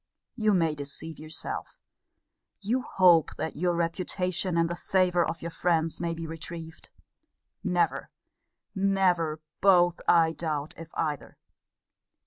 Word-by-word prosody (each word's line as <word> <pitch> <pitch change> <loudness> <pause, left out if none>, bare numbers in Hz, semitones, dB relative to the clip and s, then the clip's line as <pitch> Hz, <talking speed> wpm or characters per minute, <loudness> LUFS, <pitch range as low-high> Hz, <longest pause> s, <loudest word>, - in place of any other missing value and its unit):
You 215 -4 +2
may 165 -3 +2
deceive 150 +2 -5
yourself: 155 +1 -6 0.8
you 230 +6 0
hope 175 -8 +4
that 160 - -4
your 175 +2 0
reputation 180 +1 -1
and 165 0 +3
the 170 - -3
favour 180 -1 +2
of 165 0 -4
your 170 - -4
friends 165 -1 0
may 170 -1 -1
be 165 0 -6
retrieved. 165 0 -8 0.7
Never, - - 0 0.6
never, 185 -6 +1 0.2
both, 175 -3 +4
I 165 -1 +5
doubt, 155 -3 -3
if 165 0 -10
either. 150 -3 -3
170 Hz, 120 wpm, -28 LUFS, 160-180 Hz, 0.8 s, I